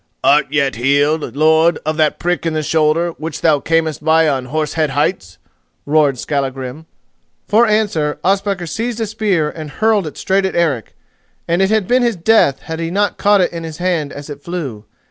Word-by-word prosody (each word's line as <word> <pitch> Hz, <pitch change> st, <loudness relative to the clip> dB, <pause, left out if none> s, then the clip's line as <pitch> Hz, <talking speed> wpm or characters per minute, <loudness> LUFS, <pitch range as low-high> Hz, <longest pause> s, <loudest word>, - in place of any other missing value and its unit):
"Art 150 Hz, +2 st, +4 dB
yet 140 Hz, -6 st, 0 dB
healed, 145 Hz, +5 st, +1 dB
lord, 160 Hz, +3 st, +3 dB
of 155 Hz, 0 st, -1 dB
that 155 Hz, -2 st, +2 dB
prick 175 Hz, -1 st, -1 dB
in 165 Hz, -, -1 dB
the 155 Hz, 0 st, -1 dB
shoulder 160 Hz, +3 st, +1 dB
which 160 Hz, -1 st, -5 dB
thou 155 Hz, -3 st, +3 dB
camest 160 Hz, -1 st, -1 dB
by 160 Hz, +1 st, +4 dB
on 135 Hz, -4 st, -1 dB
Horse 155 Hz, +3 st, -2 dB
Head 155 Hz, -2 st, 0 dB
Heights?" 135 Hz, -, -2 dB, 0.5 s
roared 145 Hz, -3 st, +2 dB
Skallagrim. 135 Hz, +2 st, -4 dB, 0.6 s
For 230 Hz, +3 st, +4 dB
answer, 205 Hz, -9 st, 0 dB
Ospakar 195 Hz, -1 st, 0 dB
seized 225 Hz, +8 st, -3 dB
a 225 Hz, -, 0 dB
spear 205 Hz, -7 st, 0 dB
and 155 Hz, -2 st, -8 dB
hurled 215 Hz, 0 st, +1 dB
it 150 Hz, -, -9 dB
straight 195 Hz, 0 st, +1 dB
at 190 Hz, -, -6 dB
Eric, 150 Hz, -10 st, -1 dB, 0.5 s
and 170 Hz, +2 st, +1 dB
it 195 Hz, -, +3 dB
had 215 Hz, -3 st, +1 dB
been 250 Hz, +1 st, +3 dB
his 235 Hz, -3 st, +1 dB
death 170 Hz, -6 st, +3 dB
had 160 Hz, 0 st, -6 dB
he 165 Hz, 0 st, -2 dB
not 205 Hz, +3 st, -1 dB
caught 205 Hz, -1 st, +4 dB
it 180 Hz, -, 0 dB
in 165 Hz, -1 st, -5 dB
his 160 Hz, -2 st, -7 dB
hand 175 Hz, -5 st, -1 dB
as 145 Hz, 0 st, -9 dB
it 145 Hz, -2 st, -9 dB
flew. 145 Hz, -11 st, -6 dB
160 Hz, 195 wpm, -17 LUFS, 150-190 Hz, 0.6 s, Art